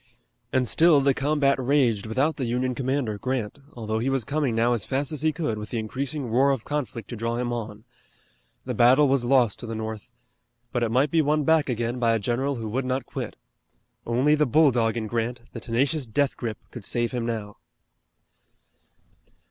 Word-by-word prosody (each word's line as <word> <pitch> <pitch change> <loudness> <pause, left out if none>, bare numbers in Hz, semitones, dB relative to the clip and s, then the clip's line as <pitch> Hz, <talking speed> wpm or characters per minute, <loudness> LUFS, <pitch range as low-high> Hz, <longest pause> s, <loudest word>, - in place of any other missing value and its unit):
And 130 -1 +1
still 165 +1 +5
the 140 0 +3
combat 140 0 +1
raged 125 -6 +2
without 135 +8 0
the 135 - -2
Union 125 +2 -1
commander, 130 -5 -2
Grant, 130 -1 -3
although 110 -2 -3
he 125 +4 0
was 135 -2 0
coming 140 -1 -1
now 115 +2 +2
as 115 -5 -1
fast 135 +2 -1
as 155 - -1
he 155 0 +2
could 145 -9 -3
with 105 - -7
the 120 - -3
increasing 135 +6 -3
roar 130 +5 +3
of 135 -5 -1
conflict 130 -7 -4
to 120 - -5
draw 115 +1 -2
him 120 0 -2
on. 110 -2 -6 0.8
The - - -3
battle 130 +5 +5
was 135 -2 +1
lost 125 -4 +3
to 120 - -7
the 115 - -4
North. 110 +1 -6 0.6
But 120 - -1
it 115 - +1
might 130 +5 +2
be 165 - +4
won 150 0 +1
back 160 -1 +3
again 120 +1 -2
by 115 -2 +3
a - - +2
general 125 +6 -1
who 115 -2 -5
would 130 +5 -1
not 130 +1 -2
quit. - - -6 0.7
Only 130 +6 +2
the 150 -1 +2
bulldog 125 -5 +3
in 110 - -2
Grant, 120 +2 -2
the 115 - -6
tenacious 130 +5 0
death 140 +5 0
grip, 115 -3 -4
could 120 - -9
save 120 +3 -1
him 120 -2 -2
now. 105 -3 -4
125 Hz, 195 wpm, -25 LUFS, 115-140 Hz, 0.8 s, still